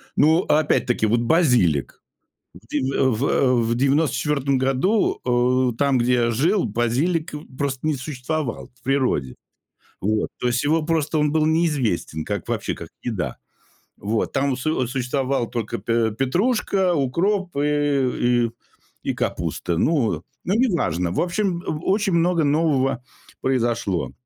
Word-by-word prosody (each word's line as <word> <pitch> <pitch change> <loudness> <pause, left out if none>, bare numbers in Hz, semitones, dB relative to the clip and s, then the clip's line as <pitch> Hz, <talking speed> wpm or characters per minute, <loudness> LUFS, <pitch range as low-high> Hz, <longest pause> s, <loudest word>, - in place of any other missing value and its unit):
ну, 160 +4 +4
опять-таки, 145 -6 +1
вот 115 +2 +2
базилик. 120 - +2 0.6
В 90 +6 -16
дев 145 -3 -1 0.3
в 130 -1 +2
в 115 +1 0
94 140 0 +1
году, 135 - +1 0.5
э, - - -15
там, 140 0 +2
где 125 +1 +2
я 120 -1 +2
жил, 165 - +2
базилик 125 - 0 0.3
просто 140 0 -2
не 155 - +2
существовал 135 0 -4
в 125 - -30
природе. 125 - 0 0.7
Вот. 105 +2 0
То 125 - 0
есть 120 0 0
его 155 +2 +2
просто 160 -1 0
он 150 -1 +2
был 155 -1 +2
неизвестен 145 - 0
как, - - -4
вообще, - - -2
как - - -9
еда. 105 -9 -3 0.6
Вот. 110 +2 -1
Там 135 -1 0
су 130 -2 -1
существовали 130 0 -1
только 115 -3 -4
п 115 +2 0
петрушка, 185 - +1
укроп 175 +7 0
и 140 -4 +1
и - - -10 0.5
и - - -1
капуста. 85 - -2
Ну. 115 - +1 0.2
Ну 185 - 0
неважно. 155 - +1
В - - 0
общем, 180 0 -1
о 150 - -3
очень 205 -2 0
много 170 -1 +2
нового 140 -4 +1 0.4
произошло, 115 -8 0
135 Hz, 135 wpm, -22 LUFS, 120-160 Hz, 0.7 s, ну